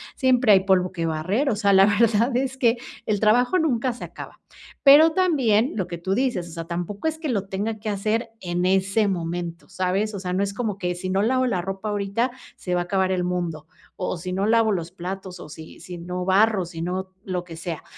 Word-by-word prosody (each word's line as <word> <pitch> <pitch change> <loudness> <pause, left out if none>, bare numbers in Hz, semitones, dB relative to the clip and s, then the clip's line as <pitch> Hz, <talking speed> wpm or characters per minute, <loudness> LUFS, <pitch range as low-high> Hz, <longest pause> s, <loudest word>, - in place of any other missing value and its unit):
siempre 255 -5 +4
hay 190 - +6
polvo 185 -1 +2
que 165 -2 -2
barrer. 185 - 0
O 215 - +1
sea, 200 -2 +3
la 190 0 +7
verdad 225 +3 +3
es 265 0 -1
que 240 -2 +3 0.3
el 210 -2 0
trabajo 245 - +3
nunca 260 -5 +1
se 240 - -7
acaba. - - -10 0.4
Pero 300 +3 +8
también 270 - +2
lo 190 -4 -2
que 170 - -5
tú 190 +3 -2
dices, 245 -9 0
o - - -11
sea, 165 0 -5
tampoco 175 - -4
es 315 - -7
que 320 - -4
lo 200 -5 -1
tenga 215 +3 -2
que 215 0 -4
hacer 215 +4 -1
en 175 0 -2
ese 195 +3 +2
momento, 170 -1 -4
¿sabes?, 190 +3 -1
o - - -4
sea, 180 -1 -3
no 195 +2 +1
es 200 0 -2
como 210 -3 -3
que 180 -2 -2
si 185 +1 -5
no 190 +1 +1
lavo 255 +4 +2
la 185 -8 0
ropa 195 +3 -4
ahorita, 205 +5 -1 0.2
se 180 - -4
va 175 - +1
a - - -1
acabar 190 +1 0
el 180 -1 0
mundo, 175 -3 -3 0.3
o 180 - -3
o - - -2
si 180 +2 -6
no 195 +2 0
lavo 225 -1 +3
los 170 -3 -2
platos, 185 +1 -6
o 150 - -10
si 160 +1 -11
si 180 -1 -8
no 180 +1 -4
barro, 195 0 +3
si 165 -1 -8
no 185 +2 -3
lo 180 -2 -3
que 170 -2 -10
sea. 165 -2 -5
195 Hz, 235 wpm, -23 LUFS, 180-225 Hz, 0.4 s, Pero